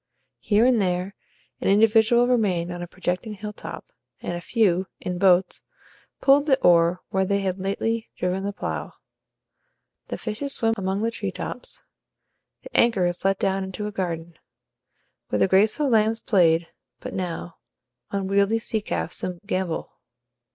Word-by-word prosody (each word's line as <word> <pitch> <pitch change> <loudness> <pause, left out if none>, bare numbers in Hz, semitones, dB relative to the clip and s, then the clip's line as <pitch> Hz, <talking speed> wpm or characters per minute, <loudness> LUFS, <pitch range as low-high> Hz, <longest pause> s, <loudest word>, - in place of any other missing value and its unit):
Here 215 +2 +3
and 250 -4 +4
there 180 +1 -1 0.5
an - - -2
individual 225 +3 +5
remained 190 -8 +1
on 175 0 -6
a 175 - -5
projecting 180 +5 -3
hilltop, 210 - -8 0.3
and - - -4
a 175 - -5
few, 190 -4 +1
in 180 -1 -4
boats, 185 -1 +3 0.6
pulled 280 +2 +5
the 270 -2 +4
oar 170 0 +4
where 190 0 +1
they 200 +1 0
had 190 -1 -2
lately 220 +4 -2
driven 180 +1 -1
the 200 - -2
plough. 200 - -5 1.1
The - - -4
fishes 275 +6 -3
swim 225 -1 +1
among 195 0 -2
the 230 - +1
tree 205 -4 -4
tops; 245 - -7 0.8
the - - -13
anchor 225 -6 +4
is 175 0 -2
let 195 0 +2
down 195 0 0
into 190 +2 -5
a 210 - -3
garden. 170 -4 -4 0.9
Where 105 - 0
the 100 - +3
graceful 215 +9 +3
lambs 225 -2 +3
played 170 -6 +3 0.3
but - - -7
now, 175 -2 -4 0.5
unwieldy 200 +2 +1
sea 220 -1 -2
calves 85 - -3 0.2
gambol. 185 -5 -2
195 Hz, 150 wpm, -24 LUFS, 180-220 Hz, 1.1 s, individual